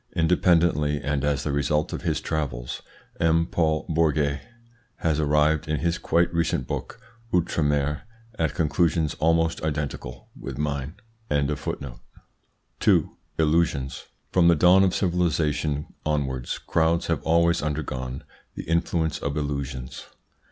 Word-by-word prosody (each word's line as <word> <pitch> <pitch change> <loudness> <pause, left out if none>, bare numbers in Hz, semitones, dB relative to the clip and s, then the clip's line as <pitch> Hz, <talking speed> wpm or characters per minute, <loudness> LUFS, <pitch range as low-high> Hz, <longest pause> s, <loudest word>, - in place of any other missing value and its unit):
Independently, 80 -3 +3
and 70 -1 -1
as 70 -1 0
the 75 - -1
result 75 +2 0
of - - -4
his - - 0
travels, 65 -6 -3 0.4
M. 80 0 +3
Paul 80 -3 0
Bourget 75 -3 +1 0.5
has 80 -2 0
arrived, 75 +1 +2
in 75 -2 -1
his 85 +1 0
quite 85 0 +1
recent 85 -6 0
book, - - -5 0.3
"Outre 85 -2 +1
Mer," 75 0 +1 0.4
at 80 -1 0
conclusions 80 -1 +1
almost 80 +1 +2
identical 75 -5 -4
with 65 -2 -7
mine. 70 +1 -2 0.3
2. 70 -3 -2 0.2
ILLUSIONS 75 -4 +1 0.3
From 90 -2 +4
the 85 - +6
dawn 90 +4 +6
of 95 -2 +2
civilisation 80 -5 0
onwards 65 -5 -1
crowds 85 +1 +1
have 80 -3 -1
always 85 +1 +3
undergone 70 -4 -3 0.3
the - - -5
influence 85 -1 0
of 70 +1 -3
illusions. 70 -3 -4
75 Hz, 125 wpm, -25 LUFS, 70-85 Hz, 0.5 s, the